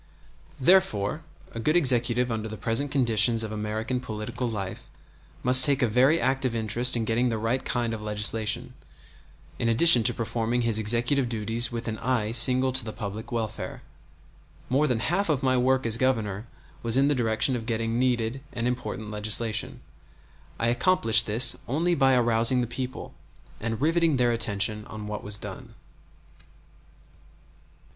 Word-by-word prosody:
Therefore 135 Hz, -, +1 dB, 0.3 s
a 115 Hz, -, -8 dB
good 155 Hz, +8 st, 0 dB
executive 125 Hz, -5 st, +2 dB
under 110 Hz, -1 st, -4 dB
the 110 Hz, -, -8 dB
present 115 Hz, +7 st, -2 dB
conditions 115 Hz, -4 st, +3 dB
of 110 Hz, -, -6 dB
American 110 Hz, +4 st, -4 dB
political 120 Hz, +1 st, -5 dB
life 100 Hz, -4 st, -7 dB, 0.5 s
must 130 Hz, +1 st, +8 dB
take 140 Hz, -2 st, +2 dB
a -, -, +3 dB
very 130 Hz, +8 st, +2 dB
active 130 Hz, -2 st, -1 dB
interest 115 Hz, +3 st, +2 dB
in 115 Hz, -, -2 dB
getting 120 Hz, +3 st, 0 dB
the 115 Hz, -, -2 dB
right 115 Hz, +4 st, -2 dB
kind 120 Hz, -2 st, -2 dB
of 110 Hz, -, -6 dB
legislation, 105 Hz, +1 st, -1 dB, 0.9 s
in 115 Hz, -, 0 dB
addition 120 Hz, +2 st, +6 dB
to 110 Hz, -, +2 dB
performing 115 Hz, +1 st, -2 dB
his 115 Hz, -2 st, +1 dB
executive 120 Hz, +4 st, 0 dB
duties 115 Hz, +1 st, -1 dB
with 115 Hz, 0 st, -6 dB
an 110 Hz, -1 st, -4 dB
eye 115 Hz, -4 st, -1 dB
single 130 Hz, +2 st, +5 dB
to 130 Hz, 0 st, +2 dB
the 110 Hz, -, -6 dB
public 105 Hz, 0 st, -8 dB
welfare. 110 Hz, -2 st, -5 dB, 0.9 s
More 140 Hz, +4 st, +1 dB
than 120 Hz, -4 st, -1 dB
half 175 Hz, -, -1 dB
of 140 Hz, -4 st, -1 dB
my 130 Hz, -1 st, +1 dB
work 130 Hz, +1 st, +1 dB
as 115 Hz, 0 st, +1 dB
Governor 110 Hz, -4 st, -2 dB, 0.3 s
was 115 Hz, +1 st, +1 dB
in 135 Hz, +1 st, +3 dB
the 145 Hz, -, +2 dB
direction 115 Hz, 0 st, 0 dB
of 115 Hz, -2 st, -6 dB
getting 115 Hz, 0 st, -2 dB
needed 125 Hz, 0 st, -1 dB
and 120 Hz, 0 st, -3 dB
important 115 Hz, -3 st, -5 dB
legislation. 110 Hz, +1 st, -1 dB, 0.8 s
I 115 Hz, -, -1 dB
accomplished 120 Hz, -4 st, +3 dB
this 115 Hz, +3 st, +6 dB
only 165 Hz, +7 st, 0 dB
by 135 Hz, -4 st, +2 dB
arousing 120 Hz, +1 st, +3 dB
the -, -, -1 dB
people, 125 Hz, +2 st, -7 dB, 0.5 s
and 115 Hz, 0 st, -4 dB
riveting 165 Hz, 0 st, +1 dB
their 120 Hz, -1 st, +1 dB
attention 105 Hz, -2 st, 0 dB
on 110 Hz, -1 st, -9 dB
what 105 Hz, 0 st, -6 dB
was 105 Hz, 0 st, -5 dB
done. -, -, -10 dB
115 Hz, 160 wpm, -25 LUFS, 110-130 Hz, 0.9 s, must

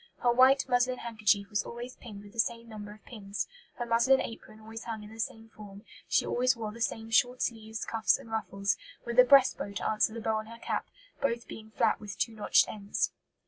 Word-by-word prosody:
"Her 240 Hz, -, +5 dB
white 260 Hz, +3 st, +5 dB
muslin 250 Hz, +1 st, +2 dB
handkerchief 215 Hz, -4 st, 0 dB
was 205 Hz, -, +1 dB
always 240 Hz, +2 st, -7 dB
pinned 205 Hz, -4 st, -10 dB
with 205 Hz, 0 st, -14 dB
the 230 Hz, -, -9 dB
same 230 Hz, +1 st, 0 dB
number 210 Hz, -2 st, -8 dB
of 215 Hz, +1 st, -15 dB
pins; 200 Hz, -4 st, -5 dB, 0.3 s
her 240 Hz, -, -3 dB
muslin 235 Hz, +3 st, +4 dB
apron 220 Hz, -2 st, -7 dB
always 220 Hz, +1 st, -9 dB
hung 220 Hz, -2 st, -5 dB
in 210 Hz, +1 st, -11 dB
the 225 Hz, -, -13 dB
same 225 Hz, 0 st, -4 dB
form; 205 Hz, -2 st, -12 dB, 0.2 s
she -, -, +2 dB
always 255 Hz, +2 st, +2 dB
wore 220 Hz, -2 st, -4 dB
the 230 Hz, +2 st, -11 dB
same 225 Hz, -1 st, -2 dB
short 245 Hz, +3 st, +3 dB
sleeves, 220 Hz, -1 st, -4 dB
cuffs, 215 Hz, -5 st, +2 dB
and 225 Hz, -, -13 dB
ruffles, 200 Hz, -3 st, -1 dB, 0.3 s
with 235 Hz, +1 st, 0 dB
a -, -, +11 dB
breast 270 Hz, 0 st, +6 dB
bow 200 Hz, -, -4 dB
to 200 Hz, -, -2 dB
answer 215 Hz, 0 st, +2 dB
the -, -, -4 dB
bow 220 Hz, 0 st, 0 dB
on 215 Hz, 0 st, -5 dB
her 230 Hz, +1 st, -10 dB
cap, -, -, -3 dB, 0.3 s
both 235 Hz, -3 st, -1 dB
being 220 Hz, 0 st, -9 dB
flat 220 Hz, -, +1 dB
with 205 Hz, -3 st, -8 dB
two 230 Hz, -, -1 dB
notched 210 Hz, -, +4 dB
ends." 200 Hz, -1 st, -2 dB
225 Hz, 225 wpm, -30 LUFS, 210-235 Hz, 0.3 s, a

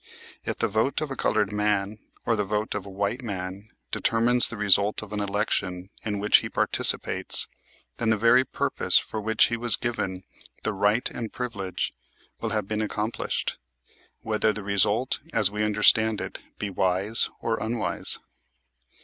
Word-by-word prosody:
If -, -, -3 dB
the -, -, +1 dB
vote 110 Hz, +6 st, 0 dB
of 155 Hz, -2 st, -4 dB
a -, -, -3 dB
colored 105 Hz, -4 st, +1 dB
man, 105 Hz, 0 st, 0 dB, 0.3 s
or 115 Hz, -, +2 dB
the 105 Hz, -, 0 dB
vote 105 Hz, +2 st, -2 dB
of 100 Hz, -, -5 dB
a -, -, -7 dB
white 100 Hz, +6 st, -2 dB
man, 100 Hz, -2 st, -6 dB, 0.2 s
determines 120 Hz, +2 st, +3 dB
the 115 Hz, -, -7 dB
result 105 Hz, +1 st, +3 dB
of 105 Hz, 0 st, -9 dB
an 105 Hz, -, -2 dB
election 100 Hz, -2 st, -1 dB
in 105 Hz, -2 st, -2 dB
which 105 Hz, +1 st, +5 dB
he -, -, -3 dB
participates, -, -, +3 dB, 0.5 s
then 115 Hz, -, 0 dB
the 110 Hz, -, +3 dB
very 115 Hz, +4 st, +5 dB
purpose -, -, +2 dB
for 110 Hz, -, -2 dB
which 110 Hz, +2 st, +3 dB
he 115 Hz, -, -1 dB
was 120 Hz, -1 st, +3 dB
given 95 Hz, -6 st, -3 dB, 0.4 s
the 110 Hz, -, -1 dB
right 105 Hz, +4 st, +2 dB
and 115 Hz, -3 st, -5 dB
privilege 100 Hz, -7 st, -4 dB, 0.5 s
will 115 Hz, -, -1 dB
have 105 Hz, -2 st, -2 dB
been 105 Hz, +1 st, -2 dB
accomplished, 110 Hz, +1 st, -3 dB, 0.6 s
whether 110 Hz, 0 st, +1 dB
the 105 Hz, -1 st, -6 dB
result, 105 Hz, +5 st, +1 dB
as 105 Hz, -3 st, +3 dB
we 105 Hz, +1 st, -3 dB
understand 105 Hz, +1 st, +4 dB
it, -, -, -6 dB, 0.2 s
be 105 Hz, -2 st, -4 dB
wise 95 Hz, +4 st, +1 dB
or 115 Hz, -1 st, -2 dB
unwise. 110 Hz, -1 st, -1 dB
105 Hz, 165 wpm, -26 LUFS, 100-115 Hz, 0.6 s, which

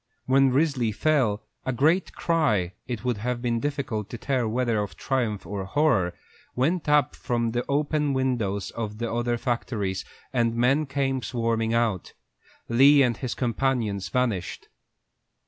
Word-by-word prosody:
When 135 Hz, +1 st, +4 dB
Risley 130 Hz, -4 st, +1 dB
fell, 115 Hz, -4 st, +1 dB, 0.2 s
a 130 Hz, -, -1 dB
great 155 Hz, +9 st, +2 dB
cry, 125 Hz, -, +1 dB
it 120 Hz, -2 st, -5 dB
would 125 Hz, -3 st, 0 dB
have 120 Hz, +3 st, -2 dB
been 120 Hz, -1 st, 0 dB
difficult 130 Hz, -7 st, -3 dB
to 120 Hz, -, -6 dB
tell 130 Hz, -1 st, 0 dB
whether 115 Hz, -1 st, 0 dB
of 100 Hz, -6 st, -5 dB
triumph 120 Hz, -8 st, -1 dB
or 100 Hz, +2 st, -4 dB
horror, 95 Hz, -, +1 dB, 0.4 s
went 155 Hz, +5 st, 0 dB
up 150 Hz, -3 st, +3 dB
from 120 Hz, -2 st, -1 dB
the 120 Hz, +1 st, -1 dB
open 150 Hz, 0 st, +1 dB
windows 120 Hz, -7 st, -1 dB
of 110 Hz, -2 st, -5 dB
the 115 Hz, 0 st, -3 dB
other 120 Hz, 0 st, 0 dB
factories, 115 Hz, -6 st, -2 dB, 0.3 s
and 115 Hz, -2 st, +1 dB
men 135 Hz, +6 st, +2 dB
came 135 Hz, -1 st, -1 dB
swarming 115 Hz, -2 st, -1 dB
out. 115 Hz, -6 st, 0 dB, 0.5 s
Lee 135 Hz, +4 st, +6 dB
and 120 Hz, -3 st, +1 dB
his 130 Hz, -3 st, -4 dB
companions 120 Hz, -5 st, -1 dB
vanished. 115 Hz, -8 st, -2 dB
120 Hz, 145 wpm, -26 LUFS, 110-135 Hz, 0.5 s, Lee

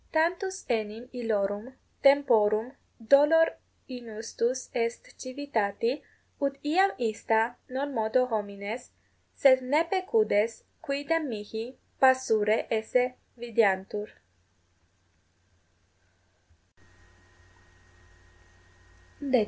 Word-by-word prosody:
Tantus 355 Hz, +4 st, 0 dB
enim 225 Hz, 0 st, -2 dB
illorum 215 Hz, 0 st, -2 dB, 0.3 s
temporum 240 Hz, -4 st, +4 dB, 0.3 s
dolor 295 Hz, +7 st, +5 dB, 0.4 s
inustus 235 Hz, +1 st, -4 dB
est 230 Hz, 0 st, -2 dB
civitati, 255 Hz, -2 st, -2 dB, 0.4 s
ut 280 Hz, -1 st, +1 dB
iam 370 Hz, +7 st, +3 dB
ista 225 Hz, 0 st, 0 dB
non 275 Hz, +2 st, -3 dB
modo 230 Hz, +2 st, +2 dB
homines, 210 Hz, 0 st, -5 dB, 0.5 s
sed 260 Hz, -2 st, +5 dB
ne 285 Hz, +6 st, +2 dB
pecudes 365 Hz, -, +1 dB, 0.2 s
quidem 290 Hz, +2 st, -1 dB
mihi 220 Hz, +3 st, -7 dB, 0.2 s
passurae 225 Hz, -5 st, +4 dB
esse 245 Hz, +3 st, +1 dB, 0.2 s
videantur. 210 Hz, -3 st, 0 dB
245 Hz, 70 wpm, -28 LUFS, 220-280 Hz, 0.5 s, dolor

